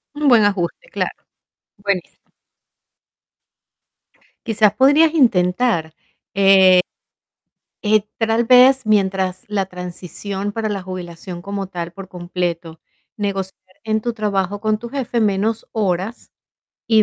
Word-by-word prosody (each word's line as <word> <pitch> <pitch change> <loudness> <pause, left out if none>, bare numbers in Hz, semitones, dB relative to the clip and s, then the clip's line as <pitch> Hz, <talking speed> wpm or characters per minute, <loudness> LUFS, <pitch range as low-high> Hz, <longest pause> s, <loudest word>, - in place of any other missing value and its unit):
Un 295 -2 +2
buen 225 -4 +6
ajuste, 200 - -2
claro, - - -4 0.5
buenísimo. 200 -3 -4 2.2
Quizás 215 -2 +2
podrías 290 +6 +5
intentar, 185 - +2 2.0
eh 215 +1 +4
eh 210 0 -8
tal 225 +1 +1
vez, 255 +2 +6
mientras 190 -3 +1
la 200 -2 -1
transición 190 +3 -6
para 220 0 -3
la 200 -2 -3
jubilación 180 -1 -8
como 200 -1 -4
tal, 170 -2 -6
por 190 +1 -10
completo, 175 -2 -4 0.4
negociar 195 -2 -5
en 220 0 0
tu 240 - -2
trabajo 205 -2 -1
con 215 0 0
tu 235 - -8
jefe 250 -3 -2
menos 215 +2 0
horas 200 +1 -2 0.6
y, 220 -2 +5
200 Hz, 115 wpm, -19 LUFS, 185-225 Hz, 2.2 s, buen